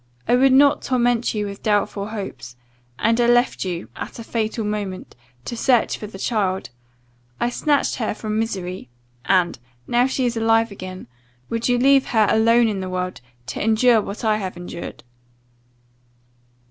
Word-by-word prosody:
I 245 - +4
would 265 +2 +5
not 280 +2 +5
torment 245 -3 +1
you 210 -1 -1
with 200 0 -7
doubtful 205 -1 0
hopes, 135 - -7 0.4
and 230 - +2
I 235 - +3
left 240 +1 +3
you 180 -2 -4
(at - - -7
a 230 - -7
fatal 225 -1 -2
moment) 205 -3 -4 0.3
to 240 - -4
search 245 0 +2
for 210 - -7
the 200 - -10
child! 190 - -1 0.7
I 240 - 0
snatched 290 +2 +1
her 220 -3 -2
from 215 -1 -3
misery 185 - -4 0.4
and 180 -7 +2 0.3
(now 245 +1 +2
she 260 -1 -1
is 240 -1 0
alive 225 0 +2
again) 185 -1 -8 0.5
would 230 +1 -1
you 245 - +3
leave 270 +2 +4
her 220 -3 +3
alone 230 +1 +4
in 205 -3 -2
the 185 -1 -4
world, 185 -4 -3 0.2
to - - -4
endure 225 +1 +4
what 200 +2 -7
I 215 -1 +3
have 190 -4 -5
endured? 175 -1 -8
220 Hz, 165 wpm, -22 LUFS, 195-240 Hz, 0.7 s, would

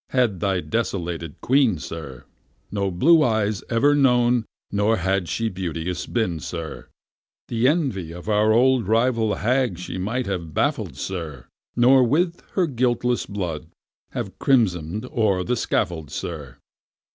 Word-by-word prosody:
had 120 -8 +1
thy 95 0 0
desolated 90 -6 -3
Queen, 130 -7 +3
sir, 75 -5 -8 0.5
No 100 -1 -1
blue 155 - +5
eyes 110 -6 +1
ever 130 +5 +3
known, 125 -4 +3 0.3
nor 105 +2 +2
had 95 -1 0
she 115 - -1
beauteous 90 -2 -4
been, 100 -9 -1
sir, 80 0 -6 0.6
The 115 +1 +2
envy 130 - 0
of 90 +4 -10
our 105 0 +3
old 125 -1 +3
rival 115 -1 +2
hag 125 -4 +1
she 90 +1 -6
might 115 +7 -2
have 85 -6 -4
baffled, 115 - 0
sir, 80 -7 -5 0.3
Nor 130 +2 +6
with 165 +8 +1
her 185 - +2
guiltless 125 -3 0
blood 90 -6 -4 0.5
have 95 -1 -5
crimson'd 105 - +1
o'er 105 -7 +1
the 125 +6 0
scaffold, 80 - -1
sir. 75 -5 -6
105 Hz, 135 wpm, -23 LUFS, 90-125 Hz, 0.6 s, Nor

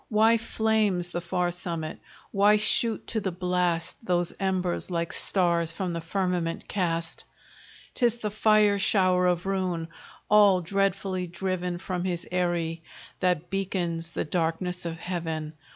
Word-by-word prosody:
Why 225 +1 +4
flames 215 -6 +1
the 175 - -3
far 175 0 0
summit? 170 -3 -4 0.3
Why 205 +1 +5
shoot 215 +2 +2
to 220 - -2
the 190 -2 -2
blast 180 0 -1
Those 175 -4 0
embers, 185 -2 0
like 170 -2 -2
stars 170 -3 +1
from 180 +1 -3
the 170 - -3
firmament 175 -1 -2
cast? 170 -4 -2 0.7
'Tis 240 -2 +2
the 215 -3 -3
fire 215 -1 +4
shower 185 -2 +3
of 175 0 +1
ruin, 185 -4 -1 0.4
all 205 -3 +6
dreadfully 195 0 -1
driven 180 0 -2
From 180 0 -3
his 175 -2 -2
eyrie, 170 -2 0 0.4
that 175 -1 0
beacons 175 -4 -2
the - - -3
darkness 175 +2 -1
of 165 0 -5
heaven. 160 -3 -4
180 Hz, 135 wpm, -27 LUFS, 170-195 Hz, 0.7 s, all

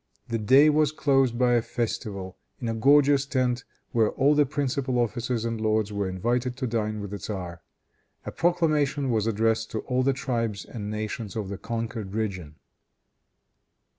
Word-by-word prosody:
The 115 0 -1
day 130 +8 +6
was 150 -1 +3
closed 135 -5 +2
by 125 0 +3
a 120 - +4
festival, 105 -5 -4 0.2
in 120 - -4
a 115 - 0
gorgeous 140 +3 +4
tent, 125 -3 0 0.3
where 110 -2 +3
all 140 +2 +3
the 145 -2 +3
principal 135 -3 -1
officers 120 0 -1
and 115 -1 -3
lords 110 -1 +1
were 100 -2 -1
invited 120 +7 -1
to 130 - -2
dine 110 -3 -2
with 100 -1 -6
the 100 - -5
tzar. 90 -5 -6 0.6
A - - -4
proclamation 150 -5 +1
was 110 -1 +1
addressed 115 +1 +1
to 110 - -3
all 125 0 0
the 135 +2 +3
tribes 115 -6 -2
and 105 -3 -6
nations 105 -1 -4
of 105 -4 -3
the 100 - -5
conquered 115 -3 -4
region. 95 -9 -3
115 Hz, 165 wpm, -26 LUFS, 105-130 Hz, 0.6 s, day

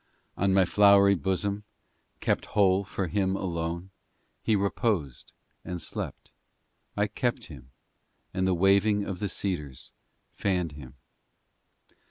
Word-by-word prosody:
VI - - -3
On 95 - +3
my 95 -1 +5
flowery 100 +1 +6
bosom, 100 +4 -1 0.6
Kept - - 0
whole 95 -1 +4
for 95 0 -3
Him 95 +2 0
alone, 85 0 -3 0.5
He 110 - +2
reposed 100 - -1 0.3
and 90 -1 -5
slept; - - -6 0.7
I - - +3
cherished - - -2
Him, 65 - -12 0.6
and 95 0 0
the 95 - +2
waving 100 +3 +3
Of 95 -3 -5
the 100 - -2
cedars 75 -11 -4 0.4
fanned 90 -5 -1
Him. 70 -3 -11
95 Hz, 125 wpm, -28 LUFS, 85-100 Hz, 0.7 s, flowery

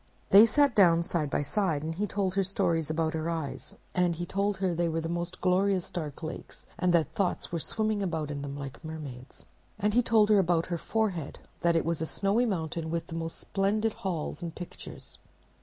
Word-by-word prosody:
They 210 +4 +9
sat 280 +4 +3
down 170 -5 +5
side 165 -4 -1
by 145 - 0
side, 160 -2 0
and 160 +1 -2
he 205 +5 -2
told 190 -2 -1
her 195 0 +2
stories 175 -5 0
about 160 0 0
her 160 +1 -2
eyes; 160 -5 -4 0.2
and 180 -2 +2
he 175 +2 -4
told 200 +2 0
her 190 -2 0
they 170 0 0
were 165 0 -1
the 165 - -3
most 175 +2 -3
glorious 185 0 +2
dark 155 -2 -5
lakes, 160 - -7
and 180 0 +3
that 160 -2 +2
thoughts 180 0 -1
were 170 - -1
swimming 215 +4 -1
about 160 -6 -2
in 145 -1 -4
them 140 0 -5
like 140 +1 -8
mermaids. 145 -5 -8 0.3
And 210 +1 +1
he 245 - +5
told 220 -3 +4
her 210 -2 +6
about 170 -3 +2
her 170 - -1
forehead; 195 -9 -1 0.2
that 170 -1 +2
it 165 - +2
was 165 -1 -1
a 160 - -1
snowy 205 +8 +1
mountain 165 -4 -2
with 165 0 -2
the 165 - -8
most 165 0 -4
splendid 210 +3 0
halls 175 -3 -4
and 170 -2 -5
pictures. 175 - -10
170 Hz, 210 wpm, -29 LUFS, 160-195 Hz, 0.3 s, They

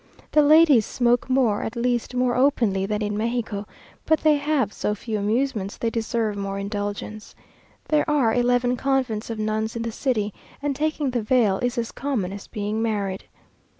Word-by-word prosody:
The 300 - +5
ladies 300 -5 +6
smoke 245 +3 +1
more, 250 -6 +2
or - - -4
at 225 - -4
least 240 +1 -1
more 250 -1 +2
openly, 230 -8 +2
than 210 +1 -1
in 210 0 -2
Mexico; 220 -2 -2 0.4
but 315 - +3
they 305 -1 +4
have 285 -7 0
so 210 - -1
few 215 +1 -4
amusements, 215 -1 -1
they 230 - -1
deserve 225 -2 -1
more 195 -1 -3
indulgence. 205 +1 -5 0.5
There 305 0 +2
are 270 -7 +3
eleven 245 0 +2
convents 255 -5 -1
of 225 - -4
nuns 215 +1 -2
in 230 - -3
the 230 - -3
city, 215 -4 -1 0.3
and 285 -1 -2
taking 300 -2 -1
the 245 -1 -1
veil 215 -4 +2
is 245 +1 -1
as 230 -1 -2
common 235 -10 -2
as 200 - -9
being 210 0 -3
married. 200 -4 -2
230 Hz, 180 wpm, -24 LUFS, 210-255 Hz, 0.5 s, ladies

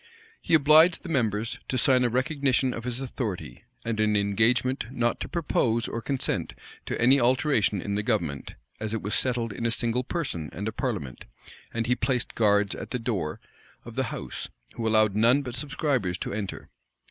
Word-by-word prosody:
He - - +3
obliged 155 +3 +6
the 180 - -7
members 115 -6 0
to 130 - -1
sign 125 +1 +4
a 120 - +2
recognition 130 0 +1
of 115 - -6
his 125 +1 -2
authority, 120 -7 -5 0.2
and 115 -2 -2
an 105 -1 +2
engagement 110 +6 +2
not 120 -2 0
to - - -5
propose 120 -8 0
or 115 - -4
consent 135 +2 -2 0.3
to - - -2
any 130 +4 +5
alteration 125 -4 +2
in 100 - -3
the 105 - 0
government, 85 - -2 0.2
as 110 0 -3
it 115 - -4
was 105 - -2
settled 120 -4 0
in 115 - -2
a - - +1
single 120 +2 0
person 125 - -3
and 100 +2 -4
a - - -1
parliament; 105 - -4 0.5
and 115 0 -2
he 125 - +2
placed 125 -2 -1
guards 105 -2 +3
at - - -7
the 125 - -2
door 105 -10 -2 0.5
of - - -9
the - - 0
house, - - -5 0.3
who 115 - -3
allowed 110 -2 +3
none 120 +6 +4
but 125 -3 -6
subscribers 135 - -1
to - - -4
enter. 100 -3 -5
115 Hz, 185 wpm, -27 LUFS, 105-130 Hz, 0.5 s, obliged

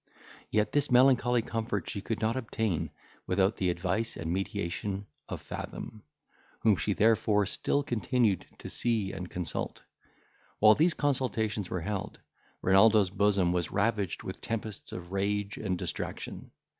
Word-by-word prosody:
Yet 105 0 +1
this 145 0 +2
melancholy 125 -2 +5
comfort 110 -5 -2
she 100 - -4
could 115 +2 -3
not 110 +2 +1
obtain 110 - -1 0.4
without 95 +3 +2
the 90 - +1
advice 95 +6 -1
and 85 +1 -2
mediation 95 +1 -3 0.2
of - - -5
Fathom, 110 - -7 0.6
whom 110 -3 +5
she 105 +3 0
therefore 105 -1 +3
still 145 +7 +1
continued 115 -3 +1
to - - -9
see 110 -5 0
and 90 -1 -6
consult. 90 -4 -4 0.7
While 110 0 +7
these 160 +7 +3
consultations 110 -8 0
were 90 - -2
held, 100 +2 -4 0.4
Renaldo's 100 0 +5
bosom 100 -3 +2
was 90 -1 0
ravaged 100 -2 0
with - - -6
tempests 110 -2 -5
of 90 0 -7
rage 100 +1 -1
and 95 -4 -2
distraction. - - -5
105 Hz, 140 wpm, -30 LUFS, 95-115 Hz, 0.7 s, While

